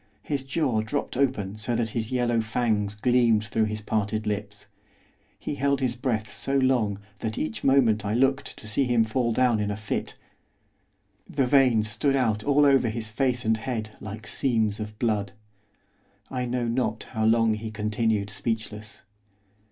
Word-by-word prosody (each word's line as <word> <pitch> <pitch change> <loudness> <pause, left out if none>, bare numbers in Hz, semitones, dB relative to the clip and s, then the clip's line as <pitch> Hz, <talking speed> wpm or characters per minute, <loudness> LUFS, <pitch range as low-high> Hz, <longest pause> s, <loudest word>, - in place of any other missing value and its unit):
His 145 -3 -1
jaw 135 -5 0
dropped 135 +6 -3
open 115 -7 0
so 115 +3 -2
that 115 -2 -1
his 110 -1 -3
yellow 120 -2 +1
fangs 110 -2 0
gleamed 115 -1 +3
through 110 +1 0
his 110 0 -4
parted 110 0 -1
lips, 105 -1 -4 0.7
he - - -4
held 140 0 +1
his 125 -3 0
breath 120 -4 -1
so 135 0 0
long 125 -7 +2 0.2
that 110 -1 -3
each 105 +1 -3
moment 120 -6 +4
I 105 +1 -1
looked 135 +2 +1
to 110 - -10
see 110 +6 +1
him 120 -2 +3
fall 115 +2 0
down 120 -1 +2
in 105 0 -1
a 100 - -3
fit; 105 -1 -4 1.1
the 140 -2 +1
veins 125 -5 +4
stood 135 +6 0
out 110 -5 +1
all 145 +1 +4
over 135 -4 +4
his 110 0 -4
face 125 +1 0
and 110 0 +3
head 110 -2 -4
like 110 +1 -8
seams 110 -5 0
of 105 0 -6
blood. 105 -4 0 1.0
I 125 -1 -2
know 120 -1 -1
not 115 -2 -1
how 110 -3 -1
long 115 0 +4
he 110 +1 -4
continued 105 -1 -1
speechless. 110 -1 -4
115 Hz, 165 wpm, -26 LUFS, 110-125 Hz, 1.1 s, moment